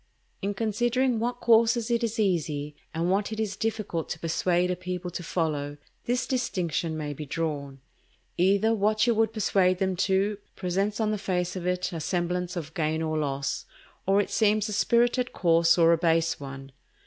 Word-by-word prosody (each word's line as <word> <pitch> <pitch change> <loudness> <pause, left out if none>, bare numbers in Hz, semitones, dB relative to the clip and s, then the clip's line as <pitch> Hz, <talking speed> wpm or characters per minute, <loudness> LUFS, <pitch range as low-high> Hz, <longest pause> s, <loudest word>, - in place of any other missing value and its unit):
In 200 +1 -2
considering 240 +3 +1
what 245 +2 -2
courses 230 0 +4
it 235 0 +1
is 230 -1 -1
easy, 150 -7 0 0.2
and 170 +3 -1
what 200 +2 0
it 220 - -4
is 210 -3 -1
difficult 210 -7 -2
to - - -3
persuade 175 +2 +1
a - - 0
people 180 0 -5
to 180 - -5
follow, 150 -4 -2 0.3
this 250 +1 0
distinction 175 - -1
may 150 -1 -3
be 150 - -7
drawn: 140 -3 -4 0.5
Either 200 +5 +3
what 215 +1 +2
you 240 - +3
would 220 0 +2
persuade 190 -4 +2
them 190 0 0
to, 195 +2 +1 0.2
presents 195 +4 -1
on 215 -1 +1
the 210 - -2
face 180 -2 -1
of 180 -1 -4
it 180 0 -1
a 165 - -3
semblance 180 +2 -2
of 155 -3 -5
gain 160 0 -1
or 155 -1 -1
loss, 140 -2 -2 0.4
or 195 +1 +4
it 205 - -1
seems 215 -1 +2
a 210 - -4
spirited 240 +3 +2
course 165 -1 +4
or 170 -1 +6
a 165 - +1
base 165 -1 +2
one. 135 -1 -8
180 Hz, 185 wpm, -27 LUFS, 165-215 Hz, 0.5 s, or